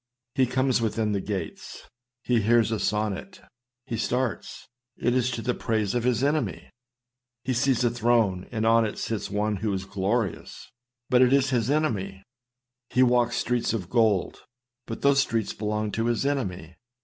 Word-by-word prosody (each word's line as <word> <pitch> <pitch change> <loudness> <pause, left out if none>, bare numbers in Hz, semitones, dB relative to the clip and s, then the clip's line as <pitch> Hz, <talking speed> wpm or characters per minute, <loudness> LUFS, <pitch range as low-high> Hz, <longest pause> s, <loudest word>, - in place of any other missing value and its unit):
He 130 -1 +2
comes 130 0 +1
within 110 -1 0
the 100 -1 -1
gates. 100 0 -6 0.4
He 120 -2 +2
hears 115 +1 +3
a 110 - -1
sonnet. 105 - -2 0.5
He 115 - -4
starts! 125 -3 -2 0.3
It 120 - +1
is 125 -1 +1
to 115 -2 -4
the 125 +2 0
praise 110 -4 -1
of 120 -1 -1
his 125 0 +1
enemy. 130 - -1 0.7
He 130 - -1
sees 130 0 +2
a 120 - +2
throne, 115 -6 +1
and 110 -2 -1
on 115 0 +5
it 105 - -3
sits 110 -3 -3
one 105 +1 -1
who 105 +2 -2
is 95 0 -3
glorious; 100 0 -3 0.4
but 125 0 +5
it 125 0 +5
is 135 -1 +3
his 120 -2 +1
enemy. 100 -11 -1 0.7
He 125 +1 +3
walks 120 -1 +3
streets 120 -1 0
of 95 -5 -4
gold, 110 -6 +1 0.4
but 115 - -6
those 140 0 +5
streets 115 -6 0
belong 105 0 -2
to 115 +2 -1
his 120 +2 0
enemy. 95 - -3
115 Hz, 170 wpm, -26 LUFS, 105-125 Hz, 0.7 s, on